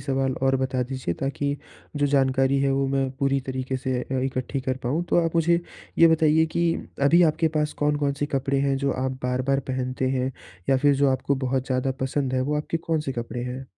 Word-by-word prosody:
सवाल 135 -1 0
और 135 0 +3
बता 130 -1 -1
दीजिए 125 -8 -3
ताकि 140 +1 -1 0.4
जो 145 0 +2
जानकारी 135 -1 +2
है, 140 - +2
वो 135 0 +1
मैं 135 -1 0
पूरी 135 0 +1
तरीके 130 0 -2
से 130 -1 -2
अ, 130 - -5
इकट्ठी 130 +1 -2
कर 130 0 -2
पाऊँ। 145 +8 0
तो - - +3
आप 165 - -2
मुझे 170 +1 +3 0.4
ये 165 - +8
बताइए 160 0 +4
कि 170 -1 +3 0.3
अभी 170 +5 +6
आपके 160 0 +3
पास 150 0 0
कौन-कौन 145 -1 +1
से 145 +1 -2
कपड़े 135 +1 0
हैं, 140 -1 +1
जो 140 0 0
आप 130 0 -2
बार-बार 130 +2 0
पहनते 130 0 -1
हैं 130 0 -1 0.4
या 135 - +4
फिर 145 +2 +3
जो 140 +1 +3
आपको 130 +1 0
बहुत 130 0 -1
ज़्यादा 130 0 0
पसंद 130 0 -1
है, 130 - +1
वो 145 +3 0
आपके 150 +2 -2
कौन-से 160 -4 -2
कपड़े 120 0 -4
हैं? 130 +1 -6
135 Hz, 210 wpm, -25 LUFS, 130-145 Hz, 0.4 s, ये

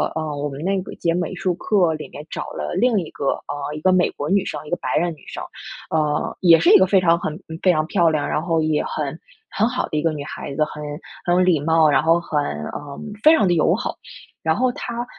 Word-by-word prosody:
呃， 155 -2 -3
我 145 - -2
们 140 +1 -7
那 195 +2 +1
个 - - -9
节 170 - 0
美 175 +1 -2
术 180 -1 -1
课 180 -2 +2
里 155 - -7
面 145 - -9
找 - - -4
了 - - -4
另 225 +1 +3
1 170 - -5
个 140 - -1 0.2
啊， 145 0 -4
1 150 - -7
个 185 - +4
美 185 -1 +3
国 145 - -5
女 195 0 +2
生， 150 - -4
1 - - -8
个 175 - 0
白 130 - -3
人 170 +2 +1
女 150 - -18
生。 - - -6 0.5
呃， 150 -2 0
也 165 -3 +6
是 - - +3
1 - - +10
个 190 - +5
非 190 0 +3
常 170 -1 +4
很 155 -1 -4 0.2
非 185 - +6
常 155 -2 +1
漂 175 -4 +3
亮， 155 -2 -1
然 - - 0
后 165 -2 +1
也 155 -1 +1
很 - - -4 0.3
很 215 +3 +1
好 250 +1 -2
的 155 - -2
1 150 - 0
个 165 - +2
女 145 -2 -5
孩 140 -1 -7
子， 155 - +2
很 150 0 -8 0.4
很 175 - +2
有 180 - +4
礼 180 -4 +3
貌， 160 +1 +3
然 145 - +3
后 165 +1 +4
很 155 -3 -1
呃， 140 - -6 0.2
非 310 +2 +8
常 210 - +2
地 175 - +3
友 155 - +3
好。 - - -3 0.5
然 160 0 +2
后 255 0 +2
她 240 0 -4
165 Hz, 255 characters per minute, -21 LUFS, 150-185 Hz, 0.5 s, 1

